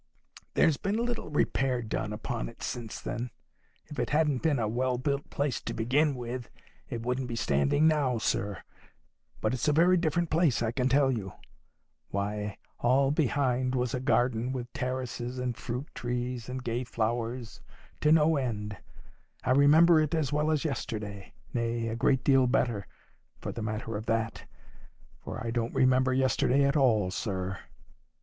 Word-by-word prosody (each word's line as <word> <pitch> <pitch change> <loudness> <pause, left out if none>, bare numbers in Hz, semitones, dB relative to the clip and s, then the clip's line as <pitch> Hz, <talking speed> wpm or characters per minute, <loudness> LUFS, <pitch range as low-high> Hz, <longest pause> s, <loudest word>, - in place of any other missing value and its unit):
There's 155 -3 +4
been 200 +1 -1
little 235 -4 -2
repair 135 -4 +1
done - - -3
upon - - -4
it - - -12
since 115 -3 -4
then. 125 +1 -4 0.6
If 150 - -8
it - - 0
hadn't 150 -4 +2
been 155 -4 +2
a 110 -3 0
well 125 +3 0
built 140 +2 -2
place 140 -3 -1
to - - -5
begin 140 +6 +2
with, 120 0 -5 0.4
it 115 -1 -4
wouldn't 125 +1 -1
be 120 - -4
standing 70 - +2
now, 145 -6 +2
sir. 100 -2 -1 0.8
But - - +1
it's 130 - -1
a - - +5
very 175 +4 +5
different 170 0 0
place, 155 -8 +3
I 110 - 0
can 125 +1 0
tell 135 0 +4
you. 100 -6 -4 0.8
Why, 105 +1 -3 0.2
all 135 +3 +3
behind 130 -3 +1
was 125 -1 0
a 130 - 0
garden 125 -2 +1
with 125 -2 -5
terraces, 125 -1 -3
and 125 -1 -2
fruit 125 +4 -4
trees, 120 0 -3
and 130 0 -4
gay 120 +1 -1
flowers, 115 0 -3 0.4
to 150 - +3
no 160 0 +5
end. 105 -6 -3 0.7
I 130 - +1
remember 155 +5 +6
it 155 +1 +1
as 150 -3 0
well 150 +1 +1
as 155 0 +1
yesterday; 105 -8 -4 0.2
nay, 115 -1 -1
a 110 - -2
great 130 +2 +2
deal 135 -2 +5
better, 120 -5 0 0.5
for - - -4
the - - -6
matter 110 +1 -3
of 110 +2 -5
that. 115 0 -1 0.7
For - - -6
I 115 - -1
don't 115 -1 -2
remember 130 0 +4
yesterday 130 +1 +3
at 140 +2 +2
all, 110 -10 +3
sir." 95 -2 -3
125 Hz, 165 wpm, -29 LUFS, 115-140 Hz, 0.8 s, remember